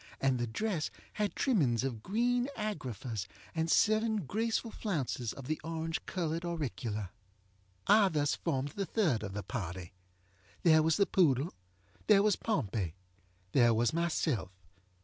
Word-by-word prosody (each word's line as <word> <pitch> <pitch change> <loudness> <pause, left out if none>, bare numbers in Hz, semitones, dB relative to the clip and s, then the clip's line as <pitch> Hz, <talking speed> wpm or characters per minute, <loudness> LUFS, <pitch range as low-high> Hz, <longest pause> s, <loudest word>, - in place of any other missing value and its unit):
And 135 -2 +2
the 120 - -1
dress 170 - -1 0.2
had 210 -1 -1
trimmings 140 - +2
of 125 -5 -3
green 240 - +1
agraffas, 125 - -4 0.3
and 160 0 -1
seven 215 -1 +3
graceful 225 - -1
flounces 135 - -2
of 135 - -9
the 155 +3 -2
orange 165 0 -3
colored 165 -2 -2
auricula. 115 - -3 0.7
I 205 -1 +6
thus 145 -3 +1
formed 135 +1 -1
the 195 +5 -4
third 160 - +1
of 100 -3 -5
the 100 0 -4
party. 90 -3 -5 0.7
There 160 -2 +6
was 160 0 +2
the 200 - +4
poodle. 155 -5 +2 0.5
There 205 -2 +6
was 210 -2 +4
Pompey. 105 - -1 0.6
There 120 -4 +5
was 120 +4 +2
myself. 160 - 0
155 Hz, 140 wpm, -32 LUFS, 120-200 Hz, 0.7 s, I